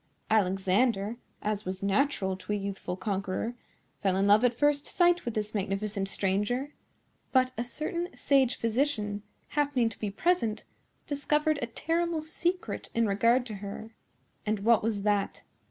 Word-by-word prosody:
Alexander, 200 +2 +2 0.3
as 210 0 -1
was 185 0 -4
natural 200 -2 +1
to 190 - -7
a - - +2
youthful 195 -3 -4
conqueror, 195 +3 -2 0.5
fell 190 -2 +2
in 195 +1 +2
love 205 +3 +6
at 245 -1 +3
first 290 0 +2
sight 350 -1 +3
with 235 - -3
this 210 0 -2
magnificent 195 0 -2
stranger; 210 +10 0 0.6
but 255 -1 +4
a 235 - -1
certain 325 +7 -2
sage 270 -3 +3
physician, 225 -4 0 0.3
happening 285 -5 +1
to 215 - -12
be 210 - -2
present, 230 - +1 0.4
discovered 300 +1 +1
a 235 - -1
terrible 330 +6 -1
secret 350 +3 -2
in 230 0 +3
regard 230 +5 +3
to 215 -4 -6
her." 205 +3 -7 0.5
"And 215 -1 -1
what 230 +2 +5
was 215 -2 -1
that?" 205 -1 0
220 Hz, 150 wpm, -29 LUFS, 200-280 Hz, 0.6 s, love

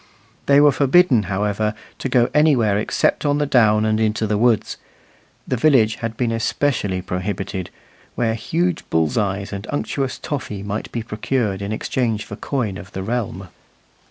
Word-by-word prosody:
They 140 0 +6
were 145 0 +6
forbidden, 140 - +4
however, 105 +2 -1 0.2
to - - -3
go 120 -2 +3
anywhere 135 -9 +3
except 105 - 0
on 145 -1 +2
the 145 - +1
down 110 -5 +3
and 110 0 +1
into 110 0 +1
the 105 0 0
woods; 115 0 +1 0.7
the 130 - -1
village 115 -5 +3
had 115 -1 -5
been 120 -2 0
especially 115 -5 -1
prohibited, 95 0 -4 0.5
where 115 -2 +1
huge 165 +10 -1
bull's 80 -2 +1
eyes 100 -2 -1
and 100 +2 -6
unctuous 135 -2 -2
toffy 105 -9 -5
might 105 +1 -4
be 115 - -3
procured 105 -2 -2
in 100 +1 -4
exchange 110 -1 -1
for 100 - -7
coin 110 -6 -3
of 95 -2 -12
the 95 - -4
realm. 100 -4 -3
110 Hz, 160 wpm, -21 LUFS, 100-130 Hz, 0.7 s, They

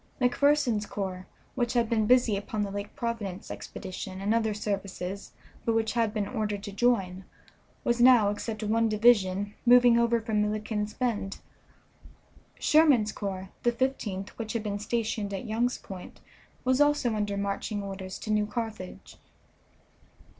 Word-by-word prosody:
McPherson's 250 -4 +2
corps, 185 -2 -5 0.3
which 240 -2 -1
had 235 -2 +2
been 220 -2 +1
busy 245 -3 +4
upon 205 +1 -2
the 200 - -4
Lake 200 +1 -6
Providence 215 -5 -4
expedition 185 0 -7
and 200 +3 +1
other 225 -1 +1
services, 200 -2 -4 0.3
but 230 - +1
which 225 -1 +1
had 230 -2 +1
been 210 -2 -2
ordered 210 -3 -3
to 205 - -6
join, 195 -4 +1 0.6
was 240 0 +1
now, 240 -5 +7
except 215 +1 -4
one 225 +2 +2
division, 205 -3 +3
moving 245 -1 +6
over 235 0 +3
from 220 -1 0
Milliken's 210 0 -2
Bend. 225 -6 -2 1.2
Sherman's 285 -9 +4
corps, 190 -2 -5
the 240 - +3
Fifteenth, 235 -6 -2
which 220 -1 -4
had 230 -2 -2
been 205 -1 -3
stationed 210 -2 -2
at 190 - -5
Young's 235 +3 0
Point, 185 -2 -10 0.5
was 260 +2 +3
also 290 -5 +3
under 205 -2 -1
marching 200 +1 -2
orders 190 -1 -6
to 215 - -5
New 210 0 +2
Carthage. 210 - -6
215 Hz, 145 wpm, -28 LUFS, 200-235 Hz, 1.2 s, now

